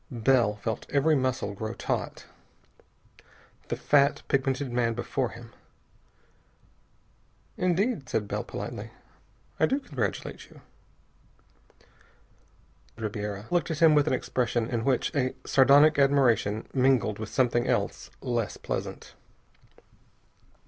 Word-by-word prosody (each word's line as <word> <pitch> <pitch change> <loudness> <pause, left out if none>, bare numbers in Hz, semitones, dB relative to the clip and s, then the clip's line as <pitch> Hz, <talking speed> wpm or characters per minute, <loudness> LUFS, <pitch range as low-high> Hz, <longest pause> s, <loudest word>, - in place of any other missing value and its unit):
Bell 120 -3 +2
felt 110 +1 -4
every 150 +2 +3
muscle 130 -6 -1
grow 110 +3 -5
taut. - - -3 1.4
The - - -2
fat, 140 0 +2
pigmented 135 -1 0
man 120 -1 0
before 125 +1 -2
him.... 115 -1 -12 2.0
"Indeed," 180 - 0
said 105 -2 -1
Bell - - -3
politely, - - -6 0.7
"I 160 - +4
do 275 - 0
congratulate 130 - -4
you." - - -17 2.4
Ribiera 105 -2 -4
looked 175 -3 +1
at 160 - -2
him 160 0 +6
with 150 0 +3
an - - +2
expression 120 -2 -1
in 115 -1 -1
which 135 +2 0
a 130 -2 0
sardonic 145 +2 +5
admiration 130 -6 +2
mingled 130 -5 +2
with 110 -1 -5
something 120 0 +1
else - - -1
less 120 -3 -2
pleasant. - - -5
130 Hz, 110 wpm, -27 LUFS, 115-140 Hz, 2.4 s, him